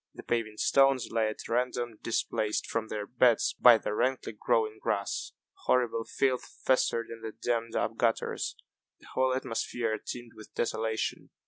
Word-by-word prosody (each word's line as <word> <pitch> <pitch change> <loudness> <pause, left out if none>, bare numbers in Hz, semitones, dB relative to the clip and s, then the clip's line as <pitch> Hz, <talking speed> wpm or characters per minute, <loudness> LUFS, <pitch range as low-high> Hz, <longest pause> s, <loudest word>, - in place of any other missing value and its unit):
The - - -9
paving 110 -2 -1
stones 135 -1 +3
lay 115 -1 +2
at 110 - -5
random, 120 -1 -1
displaced 110 -1 -1
from 115 -1 -2
their 105 -2 -4
beds 120 0 +3
by 120 -2 +9
the 105 - -3
rankly 130 +2 0
growing 110 0 0
grass. 100 -1 -2 0.3
Horrible 115 -2 +2
filth 130 -2 0 0.2
festered 115 -3 +2
in 115 0 -8
the 110 - -5
dammed 115 -1 -2
up - - -1
gutters. - - 0 0.4
The - - -16
whole 130 0 +2
atmosphere 115 -3 -2
teemed 120 -1 -7
with 110 -1 -14
desolation. 110 -1 -1
115 Hz, 150 wpm, -30 LUFS, 110-125 Hz, 0.4 s, by